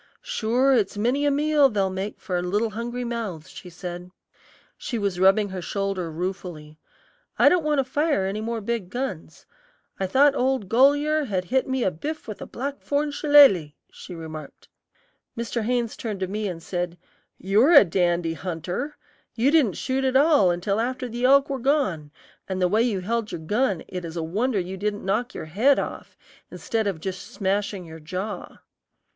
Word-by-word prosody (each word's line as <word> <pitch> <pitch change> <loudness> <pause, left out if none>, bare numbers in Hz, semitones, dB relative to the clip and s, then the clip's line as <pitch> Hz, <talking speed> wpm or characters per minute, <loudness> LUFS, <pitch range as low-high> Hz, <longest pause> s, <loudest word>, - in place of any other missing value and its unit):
"Sure, 260 - +1
it's 210 -5 +1
many 255 +7 +1
a - - +5
meal 295 0 +3
they'll 195 -4 0
make 190 +2 -5
for 180 -3 -2
little 205 +5 0
hungry 240 +3 -4
mouths," 225 -10 -5
she 180 - -10
said. 175 0 -7 0.7
She 240 - -4
was 200 -4 -2
rubbing 195 +2 +4
her 190 -1 -5
shoulder 195 -1 -2
ruefully. 160 -3 -6 0.6
"I - - +7
don't 360 - +3
want 300 -1 +1
to 270 - +3
fire 290 -4 0
any 200 +3 -3
more 230 0 -3
big 215 -3 -3
guns. 190 -11 -5 0.5
I 190 - 0
thought 275 +8 +4
old 260 -6 0
Goliar 290 +6 +3
had 185 -4 -2
hit 260 +7 0
me 260 -1 0
a 190 - +1
biff 305 - -6
with 215 - -7
a - - -6
blackthorn 285 +2 -2
shilaley," 280 - +5 0.2
she 180 - -10
remarked. 155 -3 -9 0.7
Mr. 235 0 -2
Haynes 240 -1 -1
turned 210 -4 -5
to 185 - 0
me 210 +2 -3
and 170 -3 -6
said, 175 -1 -3 0.4
"You 195 +3 +2
are 285 +7 +5
a 285 -9 +9
dandy 175 -1 0
hunter! 180 - -4 0.4
you 245 +5 +2
didn't 265 - +3
shoot 265 +1 -1
at 260 0 0
all 285 - +5
until 180 +4 0
after 255 +2 -2
the 240 +1 -2
elk 275 +1 +5
were 275 -1 -3
gone, 230 - 0 0.4
and 190 -1 -2
the 180 - +3
way 215 +5 +2
you 220 -6 0
held 225 +3 -2
your 160 - -5
gun 205 +2 0
it 180 -1 -6
is 165 0 -7
a 165 - -2
wonder 210 +8 -1
it 185 +1 -3
didn't 205 0 -2
knock 230 +6 -1
your - - -5
head 225 - +3
off, - - -5 0.3
instead 220 -2 -2
of 190 -5 -2
just 190 +3 -5
smashing 200 -3 -2
your 160 0 -10
jaw." 185 +5 -6
210 Hz, 185 wpm, -24 LUFS, 180-260 Hz, 0.7 s, a